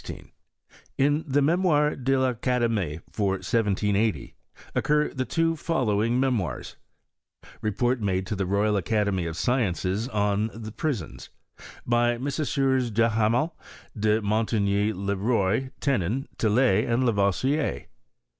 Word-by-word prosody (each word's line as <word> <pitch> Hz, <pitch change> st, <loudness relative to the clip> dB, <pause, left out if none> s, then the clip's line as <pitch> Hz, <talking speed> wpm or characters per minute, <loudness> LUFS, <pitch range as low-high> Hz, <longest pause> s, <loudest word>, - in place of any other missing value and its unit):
In 145 Hz, +3 st, +2 dB
the 140 Hz, +1 st, +2 dB
Mem. 170 Hz, +6 st, +2 dB
de 150 Hz, -6 st, +2 dB
I'Academie, 120 Hz, -, 0 dB
for 100 Hz, -3 st, 0 dB
1780, 105 Hz, 0 st, 0 dB, 0.4 s
occur 150 Hz, 0 st, +1 dB
the 130 Hz, -1 st, -2 dB
two 165 Hz, +6 st, +1 dB
following 120 Hz, -7 st, 0 dB
memoirs; 125 Hz, -8 st, -1 dB, 0.9 s
Report 120 Hz, +4 st, 0 dB
made 95 Hz, -2 st, 0 dB
to 105 Hz, -, -3 dB
the 95 Hz, -1 st, -2 dB
Royal 100 Hz, +2 st, +1 dB
Academy 100 Hz, -3 st, 0 dB
of 80 Hz, 0 st, -5 dB
Sciences 105 Hz, -3 st, 0 dB
on 105 Hz, -1 st, 0 dB
the 110 Hz, -1 st, -7 dB
Prisons. 120 Hz, -, -4 dB, 0.6 s
By 120 Hz, 0 st, +2 dB
Messrs. 135 Hz, -1 st, 0 dB
Duhamel, 115 Hz, +7 st, +1 dB, 0.4 s
De 110 Hz, 0 st, +1 dB
Mon 110 Hz, +2 st, +1 dB
tigny, 100 Hz, -1 st, +1 dB
Le 100 Hz, 0 st, -2 dB
Roy, 110 Hz, +3 st, 0 dB
Tenon, 130 Hz, 0 st, 0 dB
Tillet, 110 Hz, +1 st, +2 dB
and 120 Hz, +2 st, +2 dB
Lavoisier. 120 Hz, +7 st, 0 dB
115 Hz, 115 wpm, -26 LUFS, 100-130 Hz, 0.9 s, In